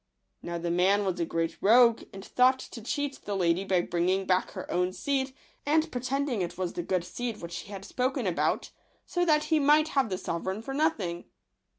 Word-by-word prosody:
Now 170 0 -4
the 170 0 -2
man 195 +4 +3
was 185 -2 -1
a 170 - +1
great 165 0 -2
rogue, 230 +2 +6
and 195 -1 -9
thought 255 +1 +4
to 240 - -9
cheat 285 +4 -3
the 205 - -2
lady 175 0 +2
by 190 -2 +2
bringing 180 +3 0
back 185 0 +2
her - - -6
own 180 +1 +1
seed, 270 +3 -1 0.3
and 315 +2 +2
pretending 255 -2 -1
it 175 -1 -4
was 185 -2 -2
the - - -3
good 180 0 -1
seed 230 +4 -5
which 170 0 -6
he 200 - -10
had 195 -1 -7
spoken 255 -1 -1
about; 180 -3 0 0.3
so 355 - 0
that 300 -2 +3
he 315 0 +2
might 300 +2 +4
have 275 -7 +1
the 185 - -2
sovereign 190 +5 -3
for 270 - -5
no 310 +3 +4
thing. 175 - -5
200 Hz, 210 wpm, -28 LUFS, 180-270 Hz, 0.3 s, rogue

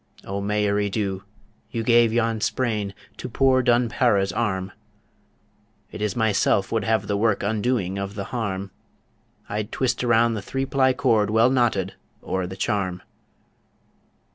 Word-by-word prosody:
O 100 +1 -3
Mairi 105 0 0
Dhu, 95 -2 -2 0.5
you 115 - -3
gave 120 -1 +4
yon 115 -1 0
sprain 105 -6 -1 0.2
To - - -6
poor 130 +2 +3
Dun 120 -1 +3
Para's 100 -5 +1
arm; 95 -5 -1 1.2
It - - -8
is 105 +2 -1
myself 105 -3 +2
would 115 -2 0
have 110 0 +1
the 105 - -1
work 105 0 +1
Undoing 105 -2 0
of 100 +1 -5
the 100 - -3
harm 100 -5 -3 0.8
I'd 105 +2 -4
twist 130 -1 -1
around 115 -1 +3
the 105 - -3
three 135 +6 -3
ply 130 -1 +2
cord 115 -7 +2
Well 110 +3 +4
knotted 110 -7 +1 0.3
o'er 95 -1 -2
the 95 +1 -8
charm. 95 -4 -1
105 Hz, 145 wpm, -24 LUFS, 100-120 Hz, 1.2 s, gave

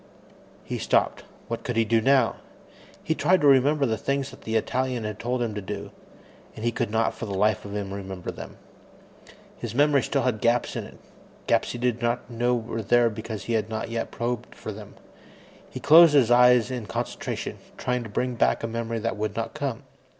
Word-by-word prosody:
He - - -4
stopped. - - +1 0.2
What 115 - -4
could 125 -3 -3
he 115 0 +3
do 115 0 +2
now? 130 -4 +3 0.7
He 160 - 0
tried 175 +5 +3
to - - +2
remember 140 +2 +4
the 110 -4 -1
things 140 +2 -1
that - - -14
the 110 - -3
Italian 125 +1 0
had 105 0 -5
told 120 +1 -1
him 115 -2 -3
to 105 - -4
do, 95 - -6 0.6
and 110 - -6
he 120 - +2
could 120 -1 -2
not 110 +1 +1
for 115 - -6
the 100 - -4
life 105 0 +1
of 100 0 -6
him 100 -2 -4
remember 95 -2 -6
them. - - -10 1.0
His - - -6
memory 145 0 +4
still - - -1
had 120 -4 0
gaps 120 +1 +1
in - - -3
it - - -13 0.5
gaps - - +1
he - - -5
did 120 -1 -1
not 120 +1 -1
know 120 +1 +1
were 115 -1 -4
there 120 +2 +3
because 110 0 -6
he 120 - -3
had 110 -1 0
not 110 +1 -4
yet 115 0 -2
probed 120 0 -4
for - - -7
them. - - -11 0.7
He - - -7
closed 160 0 +7
his 125 -5 +4
eyes 125 0 +5
in 120 -4 -4
concentration, 90 - -4 0.2
trying 125 0 -1
to 115 - -7
bring 125 +5 -1
back 115 - +1
a - - 0
memory 115 0 -3
that 115 0 -2
would 105 -1 -3
not 115 - -3
come. 140 -4 -4
115 Hz, 210 wpm, -25 LUFS, 110-125 Hz, 1.0 s, closed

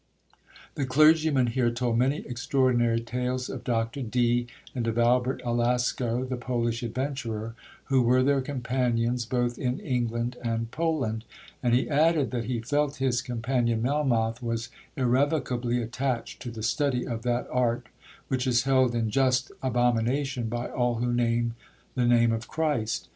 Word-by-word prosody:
The 140 - -2
clergyman 155 0 +4
here 120 0 +1
told 120 -1 0
many 135 +4 +1
extraordinary 120 -2 +1
tales 125 +2 -3
of - - -6
Dr 115 +2 -1
Dee, 120 0 +1 0.3
and 120 -3 -2
of 115 0 -1
Albert 125 +2 +2
Alasco, 120 +1 0
the 130 -1 -3
Polish 120 -1 -1
adventurer, 120 -2 -3 0.3
who 135 -2 +2
were 125 +2 +4
their 140 0 +3
companions 125 -3 -1
both 120 0 -1
in 125 0 -1
England 120 -2 -2
and 115 -1 -2
Poland—and 125 -5 -2
he 125 - +1
added, 155 -1 +2
that 120 -3 -2
he 125 -2 -2
felt 145 +4 0
his 130 -3 0
companion 120 -2 -1
Melmoth 120 -5 +1
was 115 -1 -3 0.3
irrevocably 125 -2 +1
attached 120 0 -3
to 120 - -5
the 115 -2 -7
study 125 +1 0
of 115 -2 -3
that 120 +1 -1
art 120 -2 +1 0.4
which 130 0 -1
is 120 -1 +3
held 130 -2 +3
in 115 -2 0
just 130 0 +2
abomination 125 0 0
by 120 +1 -3
all 120 -1 0
'who 120 +1 -1
name 120 -1 +1 0.4
the 125 -2 +1
name 120 -1 +4
of 115 +1 -3
Christ.' 150 -9 -1
125 Hz, 150 wpm, -27 LUFS, 115-130 Hz, 0.4 s, clergyman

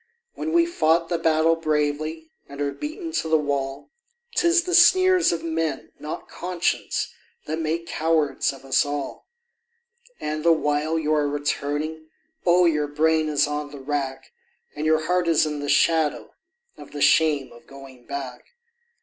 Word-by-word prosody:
When 320 - -4
we've 340 0 +2
fought 165 - +2
the 170 -2 -1
battle 160 0 +3
bravely 155 0 -2 0.2
and 140 0 -10
are 145 -1 -1
beaten 320 - -6
to 320 - -1
the 160 - +4
wall, 140 -1 -3 0.4
'Tis 340 0 +3
the 360 0 -4
sneers 370 +1 +5
of 170 - -3
men, 160 -3 -3
not 150 - -6
conscience, 180 -1 -2 0.3
that 155 +1 -3
make 165 +1 -2
cowards 160 -3 0
of 135 -1 -13
us 135 - +3
all; 145 -1 -5 0.9
And 155 0 -3
the 170 - +5
while 150 +1 0
you 155 -1 0
are 150 -1 +2
returning, 145 +2 -3 0.4
oh! 175 +1 +5
your 150 -3 +1
brain 155 +1 +1
is 145 -1 +2
on 150 0 -4
the 145 - -10
rack, 135 -1 -4 0.4
And 150 +1 -2
your 155 0 +2
heart 180 +1 +1
is 160 -2 +3
in 150 -1 -3
the 145 0 -4
shadow 155 +1 +2 0.5
of 145 - -12
the 145 - -5
shame 150 -4 +3
of 120 - -17
going 135 -3 -14
back. 140 - -7
155 Hz, 160 wpm, -24 LUFS, 145-165 Hz, 0.9 s, sneers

